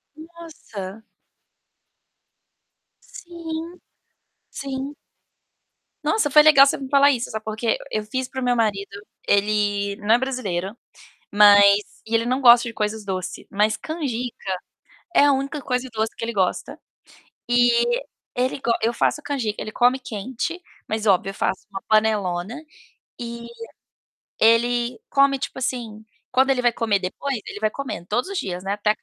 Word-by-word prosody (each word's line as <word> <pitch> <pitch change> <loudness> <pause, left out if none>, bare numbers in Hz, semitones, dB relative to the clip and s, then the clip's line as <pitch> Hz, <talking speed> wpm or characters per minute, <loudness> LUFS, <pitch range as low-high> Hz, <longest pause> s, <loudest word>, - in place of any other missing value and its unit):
Nossa. 310 - -10 2.1
Sim, 330 -2 -7 0.9
sim. 275 +1 -5 1.1
Nossa, 430 -9 +1
foi 300 +2 +7
legal 290 -3 +8
você - - 0
me 270 -1 -7
falar 280 +1 +5
isso, 245 -3 -2
sabe 220 0 -5
por 220 - -4
quê? 225 0 0
Eu 215 -1 -2
fiz 255 +4 -3
para 260 0 -6
o - - -2
meu 245 -1 +1
marido, 205 -3 0 0.4
ele 205 0 +1
não 215 +2 +4
é - - +4
brasileiro, 210 -7 -3 0.6
mas 205 -1 +8 0.3
e 220 - -11
ele 230 0 +2
não 255 +2 0
gosta 240 -2 +7
de 230 - -8
coisas 210 0 -2
doce, 185 -2 -5
mas 210 +2 +1
canjica 250 - -4 0.7
é - - +7
a 285 - +5
única 275 +2 -2
coisa 250 0 -2
doce 220 -1 -2
que - - -11
ele 230 0 -3
gosta. 185 -2 -1 0.7
E 240 0 +3 0.3
ele 255 +2 -1
go 240 - 0
eu 230 +2 +1
faço 300 - 0
canjica, 260 -8 -3
ele 215 - -5
come 250 +3 +3
quente, 255 - -5 0.2
mas, 220 0 -3
óbvio, 195 -1 +3
eu 195 - -6
faço 190 - -2
uma 195 - -6
panelona, 215 -2 +1 0.6
e 235 0 -7 0.9
ele 240 - +2
come, 275 -1 +3
tipo 265 - -5
assim, 230 -4 -4 0.3
quando 260 +2 +3
ele 260 - +2
vai 240 -1 +3
comer 220 -3 +1
depois 225 +7 -4
ele - - -7
vai 215 0 +1
comendo, 265 -9 -6
todos 240 - -1
os 395 - -5
dias, 180 -1 -4
né, 195 - -1
até 210 +1 0
acabar. 215 - -2
235 Hz, 155 wpm, -22 LUFS, 210-265 Hz, 2.1 s, legal